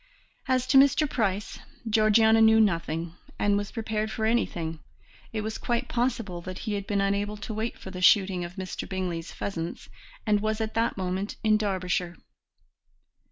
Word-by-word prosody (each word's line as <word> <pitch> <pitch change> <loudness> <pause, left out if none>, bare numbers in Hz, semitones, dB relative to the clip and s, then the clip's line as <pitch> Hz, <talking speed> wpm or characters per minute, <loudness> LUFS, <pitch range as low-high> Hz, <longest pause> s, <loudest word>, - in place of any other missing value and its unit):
As 255 -1 +2
to 270 +1 +6
Mr. 280 +2 +4
Price, 210 -6 -2 0.3
Georgiana 220 +1 +5
knew 220 0 +6
nothing, 170 -5 0 0.2
and 205 0 +2
was 205 0 -2
prepared 220 -2 -2
for 220 0 -2
anything; 170 -8 -1 0.5
it 220 - -2
was 220 +1 -4
quite 240 +1 -1
possible 230 -8 -1
that 185 +1 -7
he 215 - -1
had 200 -1 -3
been 200 -1 +1
unable 200 +1 0
to 215 +1 -6
wait 220 +2 -3
for 190 - -9
the 180 -1 -7
shooting 185 0 +4
of 175 +1 -7
Mr. 190 -1 -5
Bingley's 180 -3 -3
pheasants 170 -4 -5 0.4
and 210 -2 +3
was 215 +1 -1
at 220 0 -2
that 230 -1 0
moment 190 +2 -2
in 215 -1 +4
Derbyshire. 185 -4 -1
205 Hz, 165 wpm, -27 LUFS, 185-220 Hz, 0.5 s, to